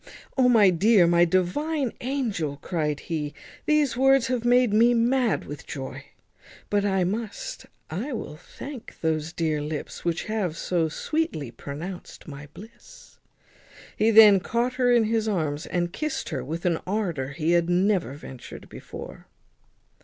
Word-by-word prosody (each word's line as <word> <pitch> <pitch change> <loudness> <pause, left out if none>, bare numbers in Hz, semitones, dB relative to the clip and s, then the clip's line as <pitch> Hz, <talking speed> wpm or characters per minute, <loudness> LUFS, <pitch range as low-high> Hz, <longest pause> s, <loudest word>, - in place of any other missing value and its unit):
"O! 255 -2 +4
my 210 -6 +6
dear, 195 +2 +5
my 170 0 +5
divine 245 - 0
angel," 225 - -2
cried 150 -4 -2
he, 150 -3 -4 0.3
"these 300 -4 +3
words 270 0 +4
have 250 -2 -1
made 245 -2 +4
me 235 +3 +5
mad 240 0 +2
with 145 - -9
joy. 135 -2 -6 0.7
But 205 -1 +2
I 190 -2 +1
must, 210 +4 -4 0.2
I 220 - -3
will 220 - -5
thank 265 - -10
those 160 0 -1
dear 160 -3 -1
lips 150 0 -5
which 170 -1 -1
have 200 -7 -2
so 170 -3 0
sweetly 160 - -2
pronounced 165 +11 -8
my 145 0 -9
bliss." 225 +8 -15 0.8
He 215 +2 +3
then 210 -3 +8
caught 235 +6 -1
her 250 -1 +2
in 240 -2 +5
his 220 0 0
arms, 155 -6 -1
and 175 0 -1
kissed 305 -2 -3
her 135 -6 -3
with 165 +7 -5
an 170 -2 +2
ardour 180 -10 -1
he 155 +3 0
had 170 0 +3
never 185 -3 +2
ventured 135 -3 -11
before. - - -10
190 Hz, 150 wpm, -25 LUFS, 160-235 Hz, 0.8 s, then